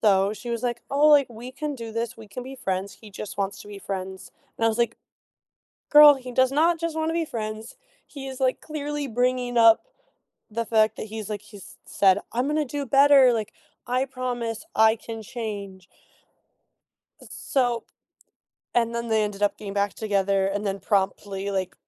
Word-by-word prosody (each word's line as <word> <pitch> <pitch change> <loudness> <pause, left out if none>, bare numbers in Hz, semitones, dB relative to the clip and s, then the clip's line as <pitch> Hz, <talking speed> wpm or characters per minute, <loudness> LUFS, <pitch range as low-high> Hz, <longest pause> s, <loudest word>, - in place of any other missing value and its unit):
Though 200 -1 +3
she 220 +3 -7
was 235 +1 -3
like, 240 -1 -2
"Oh, 285 +2 +4
like, 290 -3 +6
we 240 +2 -9
can 295 +1 -4
do 230 -3 -7
this. 230 0 -3
We 220 -2 -13
can 250 - -7
be 265 +1 -8
friends. 195 -5 -3
He 215 -2 -15
just 195 +1 -8
wants 200 +1 -2
to - - -14
be 205 -1 -8
friends." 190 -1 -6 0.3
And 225 - -1
I - - +5
was 225 +1 -2
like, 235 -1 +1 0.9
"Girl, 295 -1 +9
he 255 -2 -8
does 260 +1 +3
not 330 +4 +3
just 335 -1 -3
wanna 320 0 -1
be 335 -1 0
friends. 220 -2 -6 0.3
He 275 -2 -8
is, 265 -1 -7
like, 260 -1 +1
clearly 295 -1 -4
bringing 245 0 0
up 230 - +6 0.7
the 230 +2 -2
fact 220 -1 +2
that - - -5
he's, 220 -1 -7
like" 210 -2 -5
he's 210 -2 -13
said, 195 0 +3
"I'm 245 +3 0
gonna 300 +1 +1
do 285 +1 -4
better. 275 -1 +6
Like, 215 -2 -3 0.4
I 255 +2 +1
promise 250 -2 -4
I 220 0 +5
can 225 0 -8
change." 200 -4 -6 1.4
S - - -14
so 245 -4 -1 0.9
and 235 -1 +1
then, 235 0 -3
they 220 -1 +2
ended 205 -1 -5
up 205 - +2
getting 200 -2 -7
back 200 0 0
together 195 -2 +1
and 200 +2 -2
then 195 0 -2
promptly, 195 0 -1
like, 190 -2 -2
230 Hz, 190 wpm, -25 LUFS, 205-260 Hz, 1.4 s, Girl